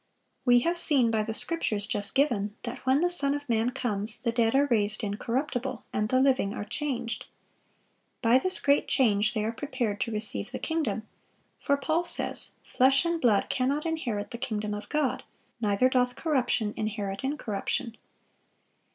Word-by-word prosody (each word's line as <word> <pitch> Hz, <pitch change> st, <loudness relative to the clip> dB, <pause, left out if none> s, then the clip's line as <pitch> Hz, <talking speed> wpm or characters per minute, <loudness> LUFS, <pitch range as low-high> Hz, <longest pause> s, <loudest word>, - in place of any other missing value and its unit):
We 245 Hz, -1 st, +5 dB
have 340 Hz, +5 st, +1 dB
seen 265 Hz, -9 st, +3 dB
by 220 Hz, -1 st, +1 dB
the 215 Hz, +1 st, -3 dB
scriptures 220 Hz, -12 st, +1 dB
just 205 Hz, -1 st, -3 dB
given 225 Hz, -8 st, +1 dB
that 245 Hz, +1 st, -6 dB
when 265 Hz, +3 st, +4 dB
the 355 Hz, -, +2 dB
Son 285 Hz, -5 st, +1 dB
of 290 Hz, 0 st, -7 dB
man 230 Hz, 0 st, +1 dB
comes, 220 Hz, -4 st, -2 dB
the 235 Hz, -, -1 dB
dead 230 Hz, 0 st, +1 dB
are 280 Hz, +1 st, +4 dB
raised 215 Hz, -4 st, 0 dB
incorruptible, 245 Hz, +4 st, -3 dB
and 210 Hz, +1 st, -1 dB
the 255 Hz, -, +3 dB
living 260 Hz, -7 st, +2 dB
are 205 Hz, -, -5 dB
changed. 245 Hz, -4 st, -4 dB, 1.0 s
By 235 Hz, +3 st, +5 dB
this 370 Hz, +7 st, +6 dB
great 285 Hz, 0 st, +2 dB
change 215 Hz, -4 st, +2 dB
they 215 Hz, -1 st, 0 dB
are 220 Hz, -, -1 dB
prepared 230 Hz, -5 st, -3 dB
to 230 Hz, -, -1 dB
receive 215 Hz, 0 st, +2 dB
the 255 Hz, -, -4 dB
kingdom; 240 Hz, -10 st, -2 dB, 0.5 s
for 280 Hz, -, +1 dB
Paul 320 Hz, +4 st, 0 dB
says, -, -, +2 dB
"Flesh 270 Hz, +4 st, +3 dB
and 335 Hz, -1 st, -1 dB
blood 215 Hz, -5 st, +3 dB
cannot 275 Hz, +4 st, -1 dB
inherit 240 Hz, -11 st, -3 dB
the 235 Hz, -, -6 dB
kingdom 215 Hz, -5 st, -3 dB
of 210 Hz, 0 st, -7 dB
God; 300 Hz, -4 st, 0 dB, 0.4 s
neither 210 Hz, +3 st, +2 dB
doth 250 Hz, -1 st, +1 dB
corruption 250 Hz, -8 st, 0 dB
inherit 205 Hz, -1 st, -4 dB
incorruption." 235 Hz, -3 st, -3 dB
245 Hz, 170 wpm, -27 LUFS, 215-280 Hz, 1.0 s, this